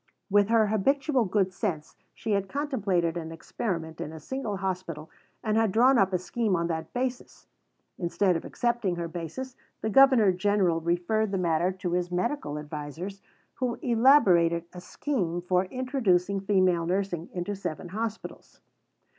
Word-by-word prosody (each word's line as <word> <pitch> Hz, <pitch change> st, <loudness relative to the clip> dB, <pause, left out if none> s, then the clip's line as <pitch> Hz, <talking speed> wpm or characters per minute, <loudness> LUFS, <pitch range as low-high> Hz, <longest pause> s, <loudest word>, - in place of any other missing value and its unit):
With 205 Hz, 0 st, +5 dB
her 225 Hz, -1 st, +4 dB
habitual 260 Hz, +5 st, +1 dB
good 190 Hz, -1 st, +1 dB
sense, 180 Hz, -7 st, -3 dB, 0.2 s
she 225 Hz, -, -4 dB
had 200 Hz, -1 st, 0 dB
contemplated 200 Hz, -, 0 dB
an 165 Hz, -1 st, -5 dB
experiment 165 Hz, -1 st, -4 dB
in 155 Hz, -, -5 dB
a 160 Hz, -, -9 dB
single 225 Hz, -, -4 dB
hospital 180 Hz, -5 st, -4 dB, 0.3 s
and 215 Hz, -1 st, +1 dB
had 225 Hz, -3 st, +3 dB
drawn 245 Hz, +4 st, +5 dB
up 195 Hz, 0 st, +3 dB
a 185 Hz, -, +2 dB
scheme 185 Hz, +3 st, -1 dB
on 170 Hz, 0 st, 0 dB
that 160 Hz, -1 st, -3 dB
basis. 250 Hz, 0 st, -4 dB, 0.5 s
Instead 180 Hz, +1 st, +1 dB
of 165 Hz, -, -3 dB
accepting 235 Hz, -7 st, -1 dB
her 170 Hz, -1 st, -3 dB
basis, 175 Hz, +11 st, -6 dB, 0.3 s
the 220 Hz, -, -1 dB
Governor 260 Hz, -5 st, +6 dB
General 185 Hz, -3 st, +1 dB
referred 175 Hz, +6 st, 0 dB
the 195 Hz, -, -1 dB
matter 175 Hz, 0 st, +1 dB
to 185 Hz, -1 st, -4 dB
his 175 Hz, 0 st, 0 dB
medical 180 Hz, -, -2 dB
advisers, 150 Hz, +6 st, -6 dB, 0.4 s
who 250 Hz, -2 st, -1 dB
elaborated 200 Hz, -, +4 dB
a 180 Hz, -, -8 dB
scheme 180 Hz, -, -2 dB
for 180 Hz, +1 st, +1 dB
introducing 200 Hz, -5 st, 0 dB
female 185 Hz, -4 st, +2 dB
nursing 180 Hz, -2 st, -2 dB
into 180 Hz, +3 st, -3 dB
seven 175 Hz, -2 st, -5 dB
hospitals. 220 Hz, +3 st, -6 dB
190 Hz, 155 wpm, -27 LUFS, 175-225 Hz, 0.5 s, Governor